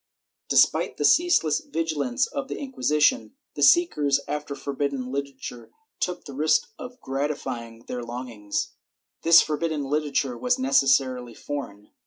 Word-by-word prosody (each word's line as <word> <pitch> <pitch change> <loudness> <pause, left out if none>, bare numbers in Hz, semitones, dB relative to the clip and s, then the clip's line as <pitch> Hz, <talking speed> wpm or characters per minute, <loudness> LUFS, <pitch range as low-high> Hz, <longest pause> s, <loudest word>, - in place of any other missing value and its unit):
^ - - -62
Despite - - +3
the - - 0
ceaseless 250 - +4
vigilance 165 - -1
of 280 -2 -5
the - - -5
Inquisition, 150 - +1 0.2
the 145 - -6
seekers 145 -1 +4
after 150 -1 -4
forbidden 140 -2 -3
literature 135 -3 -6 0.3
took 180 -1 -3
the 140 - -9
risk 155 - +1
of 250 0 -9
gratifying 130 - -4
their 125 - -4
longings. 120 -4 -4 0.5
This 165 0 +7
forbidden 155 -1 -2
literature 140 -2 -1
was 250 0 +1
necessarily 130 - +2
foreign. 105 -8 -7
145 Hz, 130 wpm, -25 LUFS, 130-165 Hz, 0.5 s, This